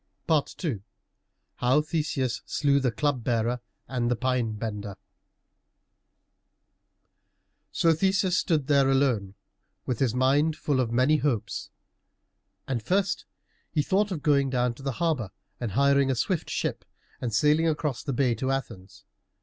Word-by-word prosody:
II 150 - 0 0.8
HOW 130 +4 +3
THESEUS 150 -5 -2
SLEW 140 -1 +2
THE 130 -3 +1
CLUB 145 -1 -1
BEARER 120 +1 0 0.3
AND 120 -2 -1
THE 120 - +2
PINE 125 -2 0
BENDER 105 -2 -5 2.7
So 165 -1 +3
Theseus 190 +2 +1
stood 160 -6 +1
there 140 -1 +3
alone, 125 -8 +1 0.5
with 125 -4 -2
his 125 -4 +1
mind 140 +5 +3
full 145 -4 -1
of 120 -3 0
many 130 +6 +3
hopes. 120 -6 -2 1.0
And 125 -4 -1
first 190 - 0 0.4
he 150 - 0
thought 200 +6 +1
of 170 -7 -4
going 140 -3 +3
down 125 -1 +1
to 120 - -14
the 135 -1 -2
harbor 155 - -1 0.3
and 115 -6 -3
hiring 140 +2 +3
a 130 - +1
swift 170 +7 -1
ship - - -2 0.4
and 120 - -2
sailing 150 +8 +3
across 150 -4 -1
the 140 - -3
bay 125 -1 +2
to 130 +4 -2
Athens. 100 -8 -5
135 Hz, 140 wpm, -27 LUFS, 120-150 Hz, 2.7 s, HOW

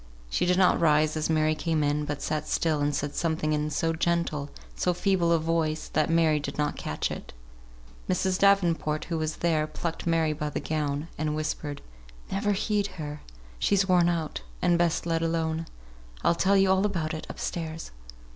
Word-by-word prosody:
She - - +1
did 180 0 +3
not 185 -1 +4
rise 155 -1 +3
as 155 0 -1
Mary 155 -1 +3
came 155 0 0
in, 145 +1 0
but 145 -1 -4
sat 155 -1 -2
still 160 -3 +1
and 145 0 +1
said 145 +1 -2
something 160 -2 0
in 150 0 0
so 165 +2 0
gentle, 160 -3 0 0.3
so 180 -1 0
feeble 180 -2 +2
a 170 - +5
voice, 160 -1 -1
that 155 0 +1
Mary 165 -2 +3
did 145 - -5
not 150 0 0
catch 75 - -3
it. - - -7 0.8
Mrs. 185 0 +1
Davenport, 175 -6 +3
who 165 -2 -2
was 155 0 -2
there, 160 -3 +1
plucked 165 +2 -4
Mary 165 -2 +2
by 150 0 -3
the - - -3
gown, 150 -1 -2
and 155 0 0
whispered, 150 -1 -3 0.5
"Never 205 +2 +1
heed 205 0 0
her; 150 -2 -6 0.4
she's 195 -1 +2
worn 175 -2 +4
out, 165 - -2 0.2
and 175 - +3
best 170 -1 +1
let 165 -1 0
alone. 165 0 -1 0.6
I'll - - +4
tell 190 +3 +3
you 195 -1 +4
all 190 +1 +3
about 170 -7 -1
it, 155 - -6
up - - -7
stairs." 160 -1 -4
160 Hz, 185 wpm, -27 LUFS, 155-170 Hz, 0.8 s, a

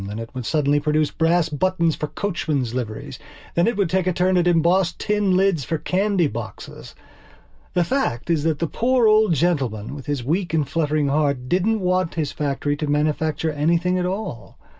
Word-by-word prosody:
Then 100 +2 -6
it 115 +2 -7
would 125 -3 -5
suddenly 145 -2 +2
produce 150 0 +1
brass 165 0 +2
buttons 170 +1 +1
for 150 - -3
coachmen's 150 - -2
liveries. 115 -4 -5 0.3
Then 170 - +2
it 235 -3 0
would 200 -3 +2
take 185 +2 0
a 185 - +2
turn 185 +2 +1
at 175 -1 +2
embossed 175 +2 +2
tin 205 -3 +1
lids 190 -6 +2
for 160 +7 -2
candy 190 +2 +1
boxes. 115 -8 -7 0.8
The 175 - +3
fact 175 - -1
is 160 -3 +2
that 160 -2 +1
the 165 - -1
poor 245 +8 +1
old 215 -4 +4
gentleman, 130 -10 -1
with 140 -1 -9
his 145 -4 -2
weak 165 +4 -1
and 150 -3 +1
fluttering 150 -1 0
heart, 140 -3 0
didn't 200 +7 +1
want 185 -1 0
his 155 -4 -1
factory 145 0 -2
to 150 - -3
manufacture 155 +2 0
anything 170 +5 +1
at 180 - 0
all. 180 - -5
165 Hz, 185 wpm, -22 LUFS, 145-185 Hz, 0.8 s, old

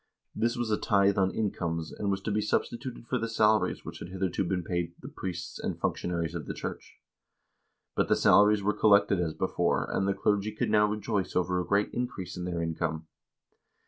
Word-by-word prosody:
This 120 +1 0
was 120 -2 -1
a 105 - +1
tithe 100 -1 +3
on 95 -1 +3
incomes, 85 -6 -2
and 100 - -3
was 95 -1 0
to 105 - -3
be 105 +1 +1
sub 105 - +2
stituted 120 0 -8
for - - -1
the 115 - -1
salaries 110 -1 +2
which - - -7
had - - -7
hitherto 95 0 -1
been 90 -1 -1
paid 85 0 -2
the - - -9
priests 85 -2 -6
and - - -3
functionaries 85 -2 -1
of 85 -5 -5
the - - -4
church. - - -6 1.0
But - - +2
the - - +4
salaries 105 0 +5
were 105 +1 +2
collected 100 -2 +4
as 80 -3 -1
before, - - 0
and 95 - +1
the 100 - +1
clergy 105 +1 0
could - - -1
now 105 0 +5
rejoice 105 -2 -2
over 90 0 +1
a 90 - -3
great 100 +1 +2
increase 120 -8 -4
in 90 -1 -4
their 85 -2 -2
income. 80 -1 -2
95 Hz, 205 wpm, -29 LUFS, 85-105 Hz, 1.0 s, salaries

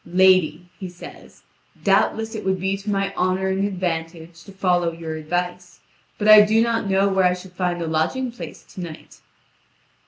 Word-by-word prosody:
"Lady," 185 -1 +3
he 185 - -6
says, 175 0 -13 0.4
"doubtless 225 +1 +1
it 215 - -5
would 190 -1 0
be 190 +1 -1
to 200 +2 -7
my 195 -1 -1
honour 185 +1 0
and 190 +1 0
advantage 170 -3 -5
to 195 - -13
follow 180 -3 +1
your 165 -1 -6
advice; 175 +3 -4 0.4
but 210 - -1
I 215 0 +10
do 215 +2 +3
not 230 -3 0
know 195 +1 +3
where 190 -1 +2
I 180 0 +3
should 180 0 -12
find 180 -1 -2
a - - -4
lodging 160 +12 -1
place 240 - -10
to 185 - -7
night." 165 -3 -10
185 Hz, 180 wpm, -22 LUFS, 175-195 Hz, 0.4 s, I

